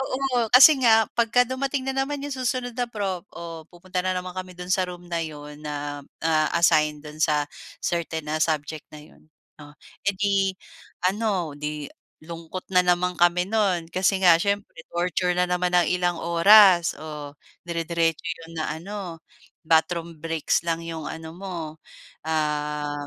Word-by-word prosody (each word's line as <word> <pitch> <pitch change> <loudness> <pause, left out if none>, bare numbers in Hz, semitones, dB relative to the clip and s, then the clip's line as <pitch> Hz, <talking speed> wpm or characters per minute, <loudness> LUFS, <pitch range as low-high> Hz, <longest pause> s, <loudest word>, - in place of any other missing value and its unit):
oo. 260 -3 -1
Kasi 275 +4 +9
nga 225 -2 +6
'pagka 235 +1 +3
dumating 265 +1 -2
na 265 - 0
naman 290 +1 -4
'yong 290 0 -4
susunod 245 0 -1
na 245 -1 0
prof, 195 -4 -3
o 165 -2 -8
pupunta 180 +1 -5
na 185 - +1
naman 180 0 -5
kami 185 0 -6
do'n 180 0 -7
sa 185 0 +2
room 175 0 -9
na 170 -1 -1
'yon 150 -1 -9
na, 145 -1 -4 0.2
ah, 155 -1 +3
assign 155 -3 +3
do'n 150 +1 -10
sa 150 -2 +2 0.4
certain 165 -2 -2
na 155 +1 -1
subject 155 -1 -2
na 150 - -10
'yon. - - -21 0.3
Oh, 145 0 -13 0.3
eh, 200 - +3
'di 195 -1 +1 0.6
ano, 195 -7 -1
'di 150 0 -5 0.4
lungkot 170 +2 -7
na 180 - +6
naman 180 0 +2
kami 175 +1 +4
no'n 195 -6 +1
kasi 190 +1 +2
nga 170 -2 +8
siyempre 200 -2 -2
torture 180 +1 0
na 180 - +3
naman 180 0 0
ng 175 -3 +3
ilang 175 -1 0
oras 175 +1 +6
oh, 150 -2 -7 0.4
dire-diretso 165 -1 -1
'yon 165 0 -6
na 150 - -3
ano, 185 -3 -7 0.4
bathroom 165 0 +1
breaks 165 0 0
lang 165 -1 -1
'yong 165 -2 -6
ano 160 0 -7
mo, 190 -1 -7 0.7
ah, 150 -2 -2
170 Hz, 160 wpm, -24 LUFS, 160-195 Hz, 0.7 s, Kasi